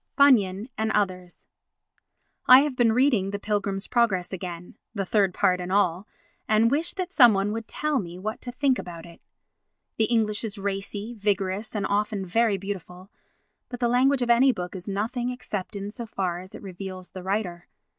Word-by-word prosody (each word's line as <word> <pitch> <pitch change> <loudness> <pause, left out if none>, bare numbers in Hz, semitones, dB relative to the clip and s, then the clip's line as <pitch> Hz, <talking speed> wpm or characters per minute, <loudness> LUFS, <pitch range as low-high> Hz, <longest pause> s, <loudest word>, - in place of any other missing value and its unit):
Bunyan 215 -8 +4
and 220 0 0
Others 185 -3 -2 1.0
I 255 +1 +10
have 290 -2 -1
been 240 -2 +3
reading 235 -5 +2
The 200 - -3
Pilgrim's 200 -1 -2
Progress 200 -7 +1
again—the 180 +3 -7
third 195 -1 +2
part 180 -1 +1
and 180 +1 -5
all—and 215 - 0
wish 320 +5 0
that 370 -2 -3
some 245 - +7
one 195 +2 0
would 225 +1 -5
tell 300 -4 -1
one 175 0 -9
what 215 +1 -4
to 245 - -5
think 260 0 +1
about 170 -2 -8
it. 170 -1 -15 0.8
The 220 - +3
English 215 -2 +1
is 215 -3 -4
racy, 200 +3 -4
vigorous 205 0 -2
and 205 - -1
often 205 -1 -1
very 220 +2 +2
beautiful; 190 -1 -7 0.6
but 245 - -7
the 240 - +2
language 255 +2 +3
of 240 - +2
any 260 +3 +5
book 180 -5 -6
is 185 +2 -7
nothing 235 +5 -2
except 210 -6 -5
in 200 +1 -5
so 235 +1 -7
far 180 -4 -2
as 185 +1 -12
it - - -11
reveals 185 -1 -8
the 185 - -8
writer. 185 -2 -3
205 Hz, 175 wpm, -25 LUFS, 190-235 Hz, 1.0 s, I